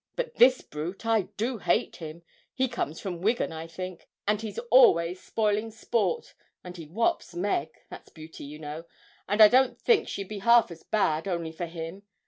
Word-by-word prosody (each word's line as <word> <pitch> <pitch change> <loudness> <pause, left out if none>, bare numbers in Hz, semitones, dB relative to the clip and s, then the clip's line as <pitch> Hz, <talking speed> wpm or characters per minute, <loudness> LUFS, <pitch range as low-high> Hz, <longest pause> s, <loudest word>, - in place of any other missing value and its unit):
But - - -3
this 255 +1 +6
brute 165 +8 -7
I 225 -4 +2
do 235 +3 -2
hate - - 0
him 160 +1 -9 0.3
he 260 0 +1
comes 230 - -4
from 175 -4 -5
Wigan, 220 +1 +1
I 160 0 -7
think, 185 +2 -8 0.2
and 210 0 +1
he's 215 -3 -6
always 180 -8 +5
spoiling 215 0 0
sport 230 - -2 0.3
and 180 -1 -9
he 165 -3 -8
whops 220 - -1
Meg 175 -5 -1 0.2
that's - - -11
Beauty, 160 0 -11
you 150 +2 -9
know, 155 +2 -7 0.4
and 205 +2 +3
I 215 - +12
don't 255 +3 +3
think 465 -4 +3
she'd 200 -1 -5
be 210 0 -6
half 235 0 +5
as 165 -1 -10
bad 165 -6 0
only 170 -3 -2
for 170 +2 -5
him. 165 +3 -7
195 Hz, 185 wpm, -27 LUFS, 165-225 Hz, 0.4 s, I